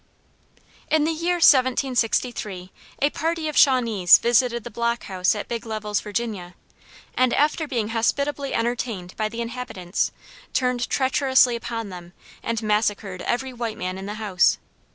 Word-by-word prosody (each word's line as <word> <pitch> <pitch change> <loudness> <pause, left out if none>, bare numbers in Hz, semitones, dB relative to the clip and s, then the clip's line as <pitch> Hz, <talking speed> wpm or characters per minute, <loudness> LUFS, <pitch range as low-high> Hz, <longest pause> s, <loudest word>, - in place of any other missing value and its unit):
[Footnote: - - -31
DeHass.] 315 - -3
In 300 - +1
the 320 - +1
year 335 +3 0
1763 245 - +2 0.3
a 285 - +4
party 325 0 -2
of 305 - -4
Shawnees 230 -9 +5
visited 235 0 +2
the 240 - -8
Block 235 0 -1
House 185 +1 0
at 210 - -5
Big 235 -1 -4
Levels, 215 -2 -3
Virginia, 205 -4 -4 0.6
and 255 -1 +2
after 300 +2 +1
being 230 -6 -2
hospitably 280 +5 -1
entertained 230 -6 -2
by 215 -1 -1
the 230 +2 -5
inhabitants, 230 -7 -3 0.4
turned 250 -2 0
treacherously 260 -2 +3
upon 230 -2 -5
them 175 -1 -10 0.3
and 230 -1 -3
massacred 210 -3 -1
every 260 +2 -2
white 235 -2 -4
man 185 +1 -4
in 195 - -7
the 210 - -5
house. 205 -5 +2
235 Hz, 155 wpm, -23 LUFS, 210-260 Hz, 0.6 s, Shawnees